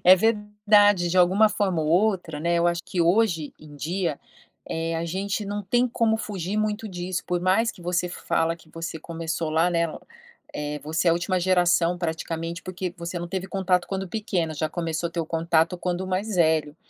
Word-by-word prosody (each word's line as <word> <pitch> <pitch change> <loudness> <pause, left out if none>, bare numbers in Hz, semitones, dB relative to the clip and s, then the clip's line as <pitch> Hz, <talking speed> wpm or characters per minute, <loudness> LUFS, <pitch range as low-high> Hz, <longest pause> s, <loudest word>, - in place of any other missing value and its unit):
É 185 +1 +9
verdade, 210 -2 +3
de 175 - -1
alguma 190 +5 +5
forma 190 -5 0
ou 155 - -1
outra, 175 -3 +1
né, 170 +2 +1
eu 170 0 +3
acho 170 0 0
que 180 - -2
hoje 170 -3 +2
em 150 -1 -13
dia, 165 +2 -2 0.5
eh, 165 0 -2
a 165 - -2
gente 195 +5 -2
não 205 +1 -3
tem 240 +6 +2
como 230 -2 +1
fugir 200 -3 -4
muito 215 +1 -1
disso, 180 -1 -3
por 180 -1 0
mais 190 +6 +2
que 175 - -15
você 180 +1 0
fala 165 -1 -1
que 170 - -21
você 165 0 -6
começou 165 0 -4
lá, 165 +3 +3
né, 170 -1 +2 0.7
eh, 150 0 -3
você 160 +3 0
é - - +6
a - - +5
última 185 +2 0
geração 175 -1 +3
praticamente, 165 0 -3
porque 185 -1 -4
você 170 +1 -5
não 175 0 -5
teve 190 +1 -3
contato 185 -2 +1
quando 195 -1 -3
pequena, 185 -6 -2
já 155 +1 -1
começou 165 0 -2
a - - -13
ter 170 - -1
o 160 - -4
contato 165 +1 +1
quando 180 +1 -2
mais 195 +3 -2
velho. 160 -3 +2
175 Hz, 200 wpm, -25 LUFS, 165-195 Hz, 0.7 s, É